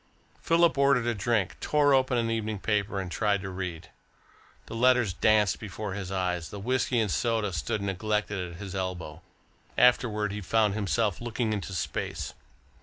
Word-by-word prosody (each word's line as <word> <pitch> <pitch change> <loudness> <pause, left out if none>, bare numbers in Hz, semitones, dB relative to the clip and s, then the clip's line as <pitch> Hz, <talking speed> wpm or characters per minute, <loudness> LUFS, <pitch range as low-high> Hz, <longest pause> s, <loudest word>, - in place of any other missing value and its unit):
Philip 165 -3 +3
ordered 140 -4 +4
a 120 - +1
drink, 105 -2 0
tore 145 -1 +3
open 130 -1 +3
an 115 -1 0
evening 110 -1 -2
paper, 100 0 -1
and 95 -2 -5
tried 105 -1 +1
to 95 - -5
read. 90 -3 -6 0.7
The - - -9
letters 125 -4 +3
danced 105 0 +3
before 105 -1 -5
his 95 -1 -5
eyes, 90 -3 -1
the 100 - -7
whisky 125 +2 0
and 105 -4 +1
soda 110 +3 0
stood 85 +6 -2
neglected 100 -2 -2
at - - -11
his 100 -2 -7
elbow. 90 -4 -4 0.6
Afterwards 105 -4 +3
he 105 - -4
found 105 +2 +2
himself 105 -1 0
looking 120 -1 -1
into 100 -2 -4
space. 90 - -3
105 Hz, 165 wpm, -28 LUFS, 95-115 Hz, 0.7 s, ordered